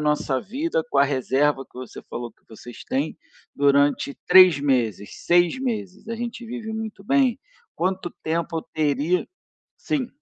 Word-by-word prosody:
nossa 150 -3 0
vida 260 - -2
com 140 - +1
a 140 - +7
reserva 135 +1 +1
que 125 - -15
você 130 - -9
falou 120 -1 -5
que - - -38
vocês 120 +2 -11
têm, 140 +4 -1 0.4
durante 140 0 +2
3 180 -4 +8
meses, 120 -8 0 0.2
6 175 +5 +4
meses? 215 -4 -4
A 230 - -3
gente 235 0 -5
vive 230 -2 -6
muito 220 -2 -6
bem? 265 0 +2 0.4
Quanto 185 0 -1
tempo 165 +1 -1
eu - - -5
teria" 155 +3 +1 0.5
Sim. 270 -5 -2
165 Hz, 155 wpm, -23 LUFS, 140-220 Hz, 0.5 s, 3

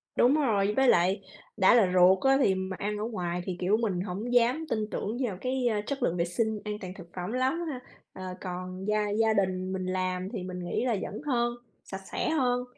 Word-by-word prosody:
Đúng 255 +4 +5
rồi, 210 -9 +2
với 265 -1 +4
lại 185 0 +4 0.4
đã 190 0 +6
là 205 -7 +5
ruột 185 +1 +6
á 270 0 +5
thì 190 -7 +4
mà 190 0 -3
ăn 210 +1 -2
ở 210 - -3
ngoài 180 -6 -3
thì, 180 -2 -4
kiểu, 195 +4 +2
mình 205 -6 -1
hổng 205 +6 -4
dám 245 +6 +3
tin 215 -2 -1
tưởng 220 +4 -3
vào 195 -6 -4
cái, 255 -1 0
ờ, 210 -3 +1
chất 275 +1 -3
lượng 175 -4 +1
vệ 170 - +1
sinh 220 +5 -1
an 210 0 -4
toàn 185 -1 -6
thực 180 -3 -11
phẩm 180 +3 -4
lắm 260 +7 0
ha? 265 -4 -4 0.3
Ờ, 185 - -8 0.2
còn 185 0 -5
gia 210 0 +1
gia 220 +2 +2
đình 185 -2 0
mình 185 -1 -3
làm 185 0 -2
thì 180 - -4
mình 180 0 -6
nghĩ 180 +7 -2
là 240 -3 +1
vẫn - - -5
hơn, 240 -4 +1 0.3
sạch 190 0 -7
sẽ - - -1
hơn. 250 -5 +1
205 Hz, 230 wpm, -28 LUFS, 185-240 Hz, 0.4 s, đã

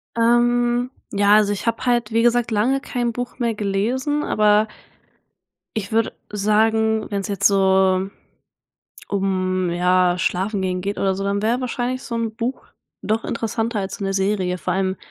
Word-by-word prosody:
Ähm, 240 +1 +2 0.2
ja, 205 0 +4
also 210 -1 +4
ich 200 - -6
habe 230 +2 -1
halt 240 -1 +1
wie 230 +1 +2
gesagt 240 0 +2
lange 245 +6 +1
kein 240 -3 -2
Buch 245 +2 -6
mehr 235 -2 0
gelesen, 235 +9 -1
aber 210 0 +3 1.1
ich 200 -2 -4
würde 225 0 +1 0.2
sagen, 220 +1 +1
wenn 200 -1 -1
es 195 - -5
jetzt 200 -2 +1
so 190 -1 +3 1.0
um, 185 -2 0
ja, 180 +1 +2
schlafen 195 +3 -1
gehen 185 -1 -1
geht 200 +2 -3
oder 195 -1 +1
so, 195 +1 -4
dann 200 +1 -1
wäre 235 +4 +1
wahrscheinlich 255 +1 -2
so 235 - -6
'n 225 -1 -2
Buch 245 +2 -4 0.4
doch 220 +2 -1
interessanter 225 -1 -2
als 190 -1 -4
so 200 - -5
'ne 195 - -1
Serie. 190 -2 0
Vor 180 - -2
allem 190 0 0
210 Hz, 165 wpm, -21 LUFS, 195-235 Hz, 1.1 s, ja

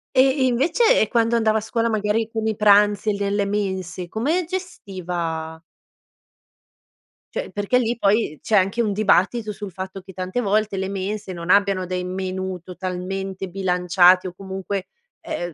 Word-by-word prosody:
Ehm, 260 +1 +6
e - - +3
invece 280 - +3
e 220 - +2
quando 230 +1 +2
andava 220 -1 +2
a - - -8
scuola 230 +1 -1
magari 215 +1 0
con 220 -1 -2
i 220 -1 0
pranzi 205 0 +4
e - - -1
nelle 200 0 0
mense, 190 -3 -3
come 295 - 0
gestiva 175 - -5 1.7
cioè, - - -3
perché 205 +5 +1
lì 235 -1 -1
poi 200 -7 +1
c'è 215 - +2
anche 195 +5 +2
un 215 -3 0
dibattito 210 +2 +2
sul 205 -1 -7
fatto 190 +2 -7
che 190 - -13
tante 185 +6 -3
volte 210 -1 +1
le 190 0 -2
mense 200 +1 -4
non 170 -1 -7
abbiano 195 -2 +3
dei 180 0 -3
menù 185 0 -4
totalmente 185 +2 -5
bilanciati, 180 0 +3
o 180 - -7
comunque, 190 +1 -5 0.3
ehm, 175 -1 -4
195 Hz, 160 wpm, -22 LUFS, 185-220 Hz, 1.7 s, Ehm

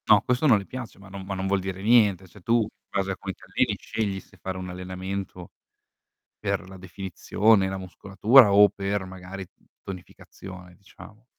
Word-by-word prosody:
No - - +7
questo 125 +5 +1
non 120 -6 +6
le 100 - -5
piace, 125 -1 -8
ma 100 0 -14
non 95 0 -8
ma 95 0 -4
non 95 0 -2
vuol 100 0 +2
dire 95 0 -5
niente. 105 -4 +4
Se 90 +3 -17
tu 115 +5 +3
in 105 - -1 0.2
base 95 -1 -1
a 95 - -4
come 95 +1 -5
ti - - -22
alleni - - +1
scegli 100 -3 -3
se - - -19
fare 95 -1 -5
un 90 0 -6
allenamento 95 0 -6 0.9
per - - -2
la 95 0 -11
definizione, 95 +2 +1
la 95 - -4
muscolatura 100 +5 +4
o 105 +1 +8
per 100 0 -2
magari 95 +1 -8 0.4
tonificazione 90 -1 -10
diciamo. 105 +3 -16
95 Hz, 185 wpm, -26 LUFS, 95-105 Hz, 0.9 s, o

